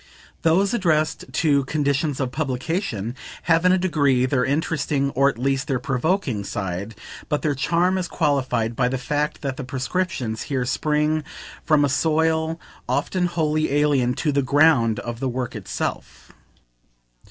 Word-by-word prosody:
Those 190 Hz, +6 st, +3 dB
addressed 160 Hz, -8 st, +1 dB
to 140 Hz, 0 st, +2 dB
"conditions 140 Hz, 0 st, 0 dB
of 130 Hz, -3 st, -1 dB
publication" 130 Hz, -, -2 dB, 0.3 s
have 165 Hz, +1 st, +3 dB
in 180 Hz, -, +6 dB
a 185 Hz, -, +4 dB
degree 145 Hz, -8 st, +2 dB
their 130 Hz, -1 st, +1 dB
interesting, 140 Hz, -1 st, 0 dB
or 140 Hz, +2 st, +3 dB
at 120 Hz, -, -5 dB
least 135 Hz, +2 st, 0 dB
their 135 Hz, -4 st, +1 dB
provoking, 135 Hz, -, -1 dB
side; 100 Hz, +1 st, -4 dB, 0.3 s
but 150 Hz, -1 st, -1 dB
their 150 Hz, -2 st, +1 dB
charm 170 Hz, +7 st, +1 dB
is 180 Hz, -, -2 dB
qualified 130 Hz, -7 st, 0 dB
by 125 Hz, 0 st, +2 dB
the 130 Hz, -, -1 dB
fact 150 Hz, +5 st, -2 dB
that 135 Hz, -1 st, -3 dB
the 150 Hz, -, -4 dB
prescriptions 130 Hz, -, -2 dB
here 130 Hz, -3 st, 0 dB
spring 150 Hz, +3 st, 0 dB, 0.4 s
from 150 Hz, -3 st, +3 dB
a -, -, +2 dB
soil 160 Hz, +2 st, +1 dB, 0.3 s
often 180 Hz, -1 st, 0 dB
wholly 155 Hz, -3 st, 0 dB
alien 140 Hz, -4 st, +2 dB
to 150 Hz, -, 0 dB
the 140 Hz, 0 st, +2 dB
ground 130 Hz, -5 st, +4 dB
of 120 Hz, -1 st, -6 dB
the 130 Hz, -, -1 dB
work 125 Hz, 0 st, -4 dB
itself. 105 Hz, -4 st, -5 dB
145 Hz, 155 wpm, -23 LUFS, 125-160 Hz, 0.4 s, in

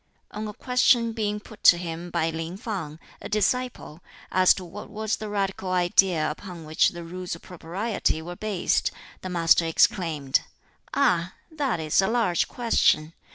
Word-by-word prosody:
On 215 Hz, +1 st, -5 dB
a 210 Hz, -, -6 dB
question 250 Hz, -1 st, +2 dB
being 210 Hz, -2 st, -2 dB
put 210 Hz, +1 st, -15 dB
to 175 Hz, -, +9 dB
him 170 Hz, 0 st, -5 dB
by 165 Hz, -1 st, 0 dB
Lin 165 Hz, +3 st, -5 dB
Fang, 190 Hz, -9 st, -5 dB, 0.2 s
a -, -, -7 dB
disciple, 215 Hz, -5 st, -1 dB, 0.3 s
as 185 Hz, -1 st, +5 dB
to 185 Hz, -, -7 dB
what 170 Hz, -, -9 dB
was 215 Hz, +1 st, -2 dB
the 215 Hz, -, -6 dB
radical 195 Hz, -2 st, -2 dB
idea 175 Hz, -3 st, +3 dB
upon 170 Hz, 0 st, -9 dB
which 155 Hz, +1 st, +3 dB
the 175 Hz, -1 st, -8 dB
Rules 180 Hz, +1 st, -5 dB
of 165 Hz, -, -15 dB
Propriety 180 Hz, +1 st, -2 dB
were 175 Hz, +2 st, -7 dB
based, 205 Hz, -2 st, 0 dB, 0.3 s
the 185 Hz, -, -5 dB
Master 170 Hz, -1 st, +3 dB
exclaimed, 155 Hz, -4 st, +2 dB, 0.5 s
"Ah! 180 Hz, -9 st, +2 dB, 0.2 s
that 280 Hz, -, -1 dB
is 155 Hz, +3 st, +2 dB
a 190 Hz, -, +1 dB
large 220 Hz, -7 st, +1 dB
question. 165 Hz, -9 st, +2 dB
185 Hz, 160 wpm, -25 LUFS, 165-215 Hz, 0.5 s, to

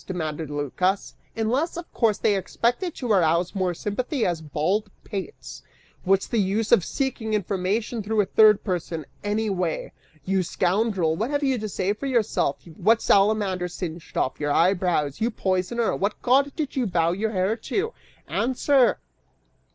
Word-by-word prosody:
demanded 160 Hz, -4 st, -4 dB
Lycas, 150 Hz, +7 st, -1 dB, 0.2 s
"unless, 255 Hz, +10 st, 0 dB
of 345 Hz, -, -8 dB
course, 220 Hz, -4 st, +2 dB
they 205 Hz, -, +2 dB
expected 240 Hz, -, -1 dB
to 245 Hz, -4 st, -3 dB
arouse 170 Hz, -2 st, +2 dB
more 185 Hz, -3 st, 0 dB
sympathy 245 Hz, -, -2 dB
as 170 Hz, -2 st, -1 dB
bald 180 Hz, +8 st, -1 dB
pates. 195 Hz, -3 st, -7 dB, 0.4 s
What's 195 Hz, +1 st, +2 dB
the 230 Hz, -, -1 dB
use 205 Hz, +3 st, 0 dB
of 235 Hz, -7 st, +6 dB
seeking 235 Hz, -4 st, -2 dB
information 205 Hz, +4 st, -1 dB
through 215 Hz, +1 st, -1 dB
a -, -, 0 dB
third 215 Hz, +1 st, +5 dB
person, 170 Hz, -5 st, -3 dB, 0.2 s
anyway? 205 Hz, -5 st, -1 dB, 0.3 s
You 190 Hz, 0 st, +1 dB
scoundrel, 185 Hz, -1 st, +1 dB
what 220 Hz, +8 st, -2 dB
have 290 Hz, 0 st, -1 dB
you 265 Hz, -3 st, +1 dB
to 215 Hz, 0 st, -4 dB
say 195 Hz, +1 st, 0 dB
for 275 Hz, +6 st, -5 dB
yourself? 230 Hz, -, 0 dB
What 185 Hz, +7 st, +2 dB
salamander 195 Hz, -4 st, +2 dB
singed 175 Hz, -2 st, -7 dB
off 130 Hz, -, 0 dB
your 145 Hz, -1 st, -1 dB
eyebrows? 170 Hz, -3 st, +1 dB
You 230 Hz, -, +2 dB
poisoner, 200 Hz, +2 st, 0 dB
what 200 Hz, +2 st, -2 dB
god 275 Hz, +3 st, +3 dB
did 300 Hz, -4 st, -3 dB
you 255 Hz, -4 st, +1 dB
vow 170 Hz, -2 st, +2 dB
your 205 Hz, +5 st, -1 dB
hair 195 Hz, +1 st, 0 dB
to? 405 Hz, -, -2 dB, 0.3 s
Answer!" 260 Hz, +1 st, +2 dB
200 Hz, 155 wpm, -24 LUFS, 180-230 Hz, 0.4 s, of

